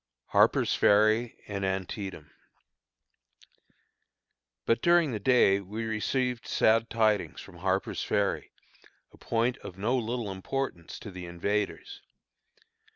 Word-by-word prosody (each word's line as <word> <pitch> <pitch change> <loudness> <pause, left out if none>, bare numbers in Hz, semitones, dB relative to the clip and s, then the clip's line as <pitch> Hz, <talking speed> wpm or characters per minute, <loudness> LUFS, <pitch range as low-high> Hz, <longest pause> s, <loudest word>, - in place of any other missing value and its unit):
HARPER'S - - +3
FERRY 110 +3 +3
AND 100 -1 -4
ANTIETAM. 95 +1 -4 2.3
But 115 - +2
during 170 -4 +4
the 110 - -3
day 100 -4 +4
we 100 +3 -6
have 110 - -3
received 125 +2 -1
sad 115 +1 +3
tidings 110 -3 +1
from 90 -3 -12
Harper's 95 +2 -1
Ferry, 100 -2 -1 0.6
a - - -20
point 120 +3 0
of 90 - -10
no 110 +6 0
little 120 -3 -2
importance 95 -2 -4
to 100 - -9
the 90 -1 -8
invaders. 105 - -3
110 Hz, 115 wpm, -28 LUFS, 95-120 Hz, 2.3 s, during